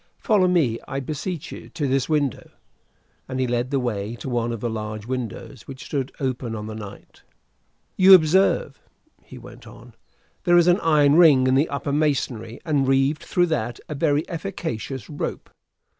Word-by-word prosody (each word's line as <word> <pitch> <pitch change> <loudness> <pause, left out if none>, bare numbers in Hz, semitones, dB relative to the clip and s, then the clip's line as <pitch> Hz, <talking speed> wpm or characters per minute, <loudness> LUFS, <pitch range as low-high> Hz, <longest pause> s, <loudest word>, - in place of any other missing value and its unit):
Follow 200 -4 +2
me, 150 -11 +1
I 135 - -3
beseech 155 +4 -5
you, - - -10
to 150 -4 -3
this 135 +1 0
window." 145 -6 -1 0.8
And 130 0 -3
he 130 - +1
led 120 0 -1
the 140 -1 0
way 110 -3 -3
to 125 - -7
one 120 -1 -1
of 115 - -4
the 120 - -1
large 110 -1 -5
windows 125 0 -6
which 135 -1 -9
stood 135 -2 -3
open 125 -4 -3
on 105 -1 -6
the 110 - -6
night. 105 -2 -11 0.8
"You 190 0 +9
observe," 190 - +2 0.4
he - - -13
went - - -13
on, - - -14 0.5
"there 175 -1 +4
is 175 - +5
an 180 +2 +4
iron 150 -3 +4
ring 150 -7 +6
in 130 - +3
the 140 +4 +2
upper 140 0 -3
masonry, 135 -6 -1
and, 145 -5 +1
reeved 135 +3 +2
through 175 - +1
that, 120 -3 -3
a - - -5
very 150 +1 0
efficacious 160 - -5
rope. 145 - -5
135 Hz, 175 wpm, -23 LUFS, 120-155 Hz, 0.8 s, You